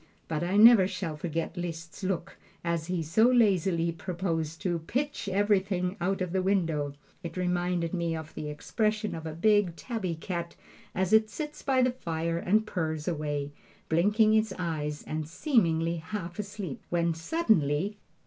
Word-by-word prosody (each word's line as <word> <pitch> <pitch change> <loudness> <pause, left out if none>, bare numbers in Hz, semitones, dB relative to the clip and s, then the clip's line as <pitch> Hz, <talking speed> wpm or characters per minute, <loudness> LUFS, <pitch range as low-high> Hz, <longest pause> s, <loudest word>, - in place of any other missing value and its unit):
But 155 -1 -2
I 185 +3 +1
never 220 -3 +8
shall 170 -5 -4
forget 165 +2 -3
Liszt's 170 -1 -6
look 190 0 -2 0.3
as 170 -2 -1
he 180 -2 -1
so 165 +9 +3
lazily 190 -8 +3
proposed 165 -2 -3
to 175 -3 0
"pitch 265 - -2
everything 195 -2 +1
out 190 +2 0
of 180 -2 -1
the 190 +1 +1
window." 165 -7 0 0.3
It 170 -1 -7
reminded 180 -1 0
me 170 -2 -1
of 160 -1 -7
the 150 - -5
expression 215 +7 -1
of 160 -1 -5
a 155 - -5
big 205 -1 +3
tabby 195 -6 -3
cat 170 0 -4 0.4
as 190 +2 0
it 220 0 +5
sits 300 +8 -6
by 260 -2 +2
the 250 - +3
fire 165 -7 -2
and 215 +5 +2
purrs 160 -6 -3
away, 145 -4 -2 0.4
blinking 210 +6 +4
its 220 -1 +3
eyes 150 -4 -3
and 155 -1 -4
seemingly 170 - +1
half 170 +2 -6
asleep, 200 -7 -5
when 170 -1 +1
suddenly 190 - +1
175 Hz, 160 wpm, -29 LUFS, 165-205 Hz, 0.4 s, never